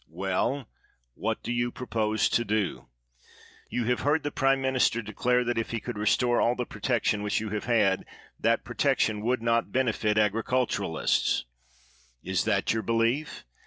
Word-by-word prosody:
Well, 95 - -1 0.5
what - - -3
do - - -3
you 120 0 0
propose 110 -3 0
to 120 - +2
do? 105 - -2 0.8
You 120 - -1
have 125 +1 0
heard 145 +3 +1
the 145 - -2
prime 135 -1 +2
minister 130 -3 +1
declare 125 +4 +1
that, 120 -1 -1
if 115 - -3
he 115 - -2
could 120 +1 -6
re 105 - -1
store 120 +2 +3
all 120 - +2
the 125 - -2
protection 115 -5 0
which 105 0 0
you 110 0 -4
have 105 0 -3
had, 105 -5 +2 0.3
that - - +2
protection 105 -2 +1
would 120 +1 0
not 115 0 +1
benefit 110 -4 +1
agi'iculturists. 105 -4 +1 0.8
Is - - -1
that - - +1
your 110 - -1
belief? 115 +7 0
115 Hz, 160 wpm, -27 LUFS, 105-125 Hz, 0.8 s, store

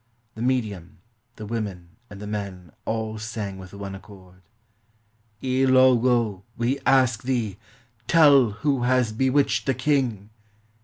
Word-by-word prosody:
The 110 - -9
medium, 110 -9 -2 0.4
the 110 - -8
women, 100 -6 -5 0.2
and 100 - -10
the 105 - -7
men 100 -5 -6
all 110 -1 -3
sang 105 -3 -5
with 95 -1 -11
one 100 -1 -7
accord: 95 -2 -14 0.4
— 110 0 -41
" 105 -1 -40
Ilogo, 130 -5 +3 0.2
we 120 +4 0
ask 130 -4 +3
thee, 120 -6 -2 0.5
Tell 145 -7 +6
who 135 +5 -1
has 125 -2 +2
bewitched 130 +5 +1
the 135 - +2
king! 120 -9 -1
110 Hz, 135 wpm, -24 LUFS, 100-130 Hz, 0.5 s, Tell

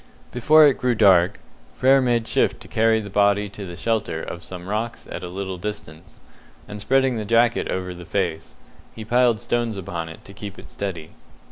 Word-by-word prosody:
Before 155 +6 +6
it 140 - +3
grew 125 -1 +1
dark, 95 -3 +4 0.4
Frere 135 +1 +4
made 120 -3 +1
shift - - +1
to - - -11
carry 110 0 +2
the 100 -2 -9
body 100 0 +2
to 100 -1 -8
the 85 - -8
shelter 110 +4 -2
of - - -7
some 90 -1 -9
rocks 110 +3 -4
at 90 - -6
a 90 - -5
little 95 0 -5
distance, 85 -4 -8 0.5
and 105 0 -7
spreading 130 +3 +2
the 110 - -3
jacket 115 +2 +2
over 90 -1 -3
the 90 0 -10
face, 85 -3 -3 0.4
he 110 - -8
piled 120 -1 +3
stones 120 0 -2
upon 85 -3 -5
it 80 - -12
to 100 - -12
keep 100 0 -9
it - - -13
steady. 85 -6 -5
105 Hz, 195 wpm, -22 LUFS, 95-115 Hz, 0.5 s, Before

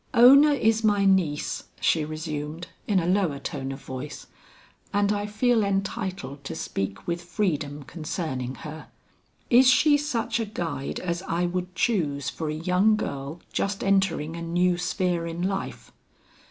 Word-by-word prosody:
"Ona 275 +5 +8
is 225 -4 +2
my 205 -2 +3
niece," 180 -7 +1
she 160 - +2
resumed 155 +1 -5 0.2
in 200 -3 +3
a 165 - -1
lower 180 -5 +1
tone 135 -1 -4
of 135 +1 -8
voice, 130 +3 -7 0.7
"and 205 0 +2
I 205 0 -2
feel 220 +2 +2
entitled 190 -7 -3
to - - -5
speak 100 -9 -4
with 170 0 -2
freedom 155 -6 -2
concerning 145 -4 -4
her. 155 +1 -8 0.6
Is 250 +1 +7
she 290 +3 +5
such 240 -5 -1
a 225 - 0
guide 165 -9 -4
as 175 -1 -2
I 170 +1 0
would 180 +1 -3
choose 150 - 0
for 160 0 -4
a 155 - -2
young 180 +6 +3
girl 140 -4 -5
just 195 0 -1
entering 190 -5 +1
a 170 - -6
new 175 +2 +2
sphere 180 -2 -1
in 170 +1 -4
life? 195 +1 -3
175 Hz, 155 wpm, -26 LUFS, 155-205 Hz, 0.7 s, Ona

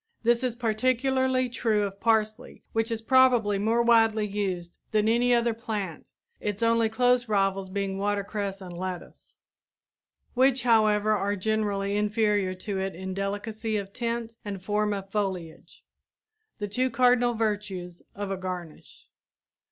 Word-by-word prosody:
This 235 +2 +3
is 250 -2 -1
particularly 255 +3 +1
true 225 -3 0
of 200 -1 -4
parsley, 220 +1 0
which 225 0 0
is 225 -1 -3
probably 245 -5 +4
more 225 +3 +2
widely 225 -2 +4
used 190 -4 -3
than 215 0 +1
any 240 +2 +3
other 235 -1 +3
plant, 215 -7 -5 0.3
its 205 +2 -3
only 230 -1 +3
close 245 +1 +2
rivals 195 -2 +1
being 195 0 -3
watercress 200 -1 -2
and 180 -2 -8
lettuce, 180 0 -7 1.0
which, 260 0 +3
however, 215 -3 +3
are 205 -1 +1
generally 205 -1 -1
inferior 210 -2 +1
to 195 +1 -4
it 190 -1 -3
in 190 +1 -5
delicacy 210 +3 -3
of 200 -1 -6
tint 235 -1 -3
and 195 -3 -6
form 210 +1 0
of 195 -1 -5
foliage, 190 -6 -4 0.7
the 205 - -3
two 255 +6 0
cardinal 245 0 +3
virtues 205 -5 -3
of 200 -1 -4
a 195 - -2
garnish. 180 -3 -8
210 Hz, 140 wpm, -27 LUFS, 195-230 Hz, 1.0 s, probably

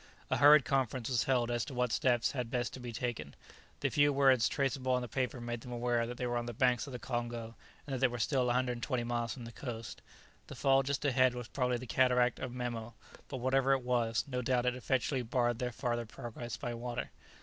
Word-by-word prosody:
A - - +3
hurried 145 0 +7
conference 130 -3 0
was 120 -4 +1
held 120 -3 +1
as 120 -1 0
to 135 -1 -8
what 125 -1 +1
steps 120 -2 +2
had 125 -4 -3
best 125 +1 -2
be 120 -1 -5
taken. 115 - -4 0.5
The - - +1
few 145 0 +4
words 135 -4 +4
traceable 135 -2 0
on 125 0 +1
the - - -4
paper 125 +1 -2
made 120 0 -4
them 125 - -9
aware 120 -1 0
that 120 0 -6
they 125 - -2
were 120 0 -1
on 120 0 -3
the 120 - -5
banks 125 +2 +2
of 135 - -8
the - - -3
Congo, 120 -1 -4 0.3
and 140 - -5
that 130 - -1
they 135 - +5
were 120 -1 -5
still 125 +2 +1
120 125 0 0
miles 120 -1 -2
from 125 -3 -8
the 115 - -8
coast. 115 -3 -7 0.5
The - - -8
fall 135 0 +4
just 140 +1 -2
ahead 130 -2 +3
was 120 -2 -6
probably 125 -2 0
the 125 - -7
cataract 125 0 +3
of 130 - -4
Memo, 120 -2 -4 0.3
but 135 - -5
whatever 135 +2 +2
it 135 -2 0
was, 120 -2 +1
no 125 -2 -2
doubt 125 0 +1
it 125 - +2
effectually 130 +1 0
barred 120 0 0
their 125 -1 -1
farther 120 -1 -2
progress 120 +1 -7
by 120 +1 -4
water. 120 +1 -4
125 Hz, 225 wpm, -33 LUFS, 120-130 Hz, 0.5 s, hurried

